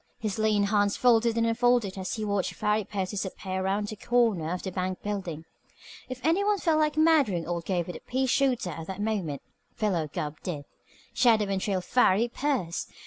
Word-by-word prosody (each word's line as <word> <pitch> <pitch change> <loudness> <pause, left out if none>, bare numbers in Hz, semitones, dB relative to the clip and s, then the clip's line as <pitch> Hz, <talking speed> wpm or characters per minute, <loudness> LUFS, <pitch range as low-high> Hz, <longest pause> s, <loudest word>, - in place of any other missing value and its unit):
His 215 -1 -3
lean 215 -2 +3
hands 205 0 +2
folded 235 -2 +3
and 230 - +2
unfolded 230 -3 +2
as 190 -1 -4
he 215 -1 -3
watched 200 -3 -1
Farry 210 0 +1
Pierce 190 -2 -3
disappear 190 -1 -4
around 200 +2 0
the 215 - -5
corner 215 -8 +1
of 180 - -3
the 190 - -4
bank 185 0 -3
building. 180 -6 -4 0.6
If 255 0 -5
any 335 +5 +3
one 415 0 +2
felt 325 -4 +2
like 305 0 +1
murdering 290 - +3
old 170 -1 -3
Gabe 180 -3 0
with 180 - -6
a - - -13
pea 260 +2 -1
shooter 255 -7 +1
at 165 +1 -7
that 190 +1 -6
moment, 200 -10 -2 0.3
Philo 180 -8 0
Gubb 150 +1 -5
did. 150 -6 -5 0.5
Shadow 225 -4 +4
and 190 -1 -1
trail 190 -2 -1
Farry 220 +2 +3
Pierce! 240 - -2
205 Hz, 195 wpm, -27 LUFS, 185-240 Hz, 0.6 s, Shadow